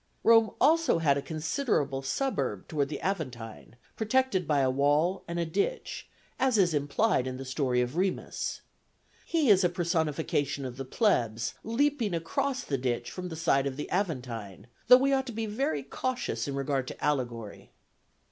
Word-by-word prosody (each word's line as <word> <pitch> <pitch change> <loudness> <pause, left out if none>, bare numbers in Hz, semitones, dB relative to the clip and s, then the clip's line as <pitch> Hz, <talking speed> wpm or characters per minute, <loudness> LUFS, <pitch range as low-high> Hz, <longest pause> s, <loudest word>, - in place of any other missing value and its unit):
Rome 225 -1 +6
also 320 - +4
had 150 -4 +3
a 140 - -1
considerable 155 - -1
suburb 135 - -2
toward 145 -3 -1
the 150 - -4
Aventine, 125 - -4 0.2
protected 220 - +1
by 145 -2 +3
a 130 - +3
wall 145 +7 +2
and 170 0 -4
a 170 - 0
ditch, 200 - -2 0.3
as 260 -3 +3
is 180 -4 +3
implied 145 - +1
in 130 0 -4
the 135 - -7
story 130 -2 0
of 125 +4 -2
Remus. 185 +1 -2 0.7
He 310 -8 +3
is 190 -1 +5
a 180 - +4
personification 160 -5 -1
of 125 -1 -6
the 135 - -5
plebs, 120 - +1
leaping 235 -4 +1
across 265 - -1
the 135 -2 -2
ditch 120 -2 -2
from 180 -1 -6
the 160 - -6
side 140 -4 +2
of 135 -1 -4
the 150 - -4
Aventine, 125 - -3 0.2
though 250 - +10
we 275 +2 +2
ought 265 0 +1
to 240 - -5
be 225 +1 -2
very 210 - -1
cautious 145 - -3
in 140 - -3
regard 135 -2 -1
to - - -8
allegory. 120 -7 -2
160 Hz, 170 wpm, -29 LUFS, 135-215 Hz, 0.7 s, though